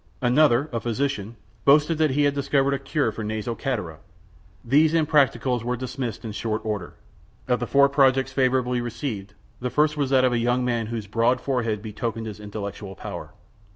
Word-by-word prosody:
Another, 130 +1 +4
a 115 - 0
physician, 120 -2 -2 0.3
boasted 150 +3 +4
that 155 -1 +3
he 145 +2 +1
had 145 -1 +3
discovered 140 0 +1
a 140 - -1
cure 140 -3 0
for 110 +1 -6
nasal 110 +2 -3
catarrh! 105 - -4 0.7
These 150 +6 +4
impracticables 140 -6 +2
were 125 +1 -2
dismissed 130 -2 -5
in 110 - -4
short 110 +1 -3
order. 105 -5 -4 0.5
Of 125 -2 +1
the 120 - -3
four 140 0 +5
projects 135 -1 +3
favorably 130 -2 +1
received, 110 -4 -5 0.2
the 125 - -2
first 150 +3 +2
was 140 -3 0
that 130 -1 +4
of 125 - +2
a 120 - +1
young 120 +2 +1
man 120 -3 -1
whose 115 -2 -4
broad 115 +4 +1
forehead 115 -6 -1
betokened 110 +1 -4
his 105 -2 -7
intellectual 100 -1 -7
power. - - -8
125 Hz, 180 wpm, -24 LUFS, 110-140 Hz, 0.7 s, four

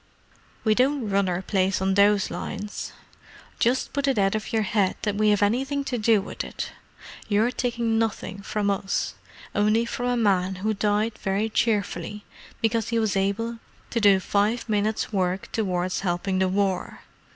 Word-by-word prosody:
"We 215 - +4
don't 255 -1 +1
run 195 -1 +2
our 180 +1 -2
place 190 -1 +1
on 190 0 +1
those 200 0 +4
lines. 205 0 -5 0.7
Just 250 +3 +1
put 280 0 0
it 270 -4 +2
out 195 -1 +3
of 215 +2 -3
your 220 -2 +2
head 200 -2 +1
that 210 - 0
we 215 +1 +2
have 205 -1 +3
anything 270 +7 +1
to 255 -3 -2
do 220 0 +4
with - - -5
it. - - -5 0.6
You're 215 +4 +3
taking 235 -3 0
nothing 215 -3 -2
from 205 0 -1
us—only 205 +2 -1
from 245 +1 -3
a 245 - +1
man 190 -4 +2
who 220 - +2
died 210 +2 0
very 200 +2 0
cheerfully 210 -3 -1 0.4
because 225 0 +1
he 230 - 0
was 220 -3 +1
able 220 +4 -1 0.3
to 235 - +1
do 200 -2 +6
five 210 +5 0
minutes' 215 0 0
work 185 -1 -1
towards 185 -4 -1
helping 185 +1 -1
the 190 0 +2
War. 195 -1 -1
210 Hz, 165 wpm, -25 LUFS, 195-225 Hz, 0.7 s, do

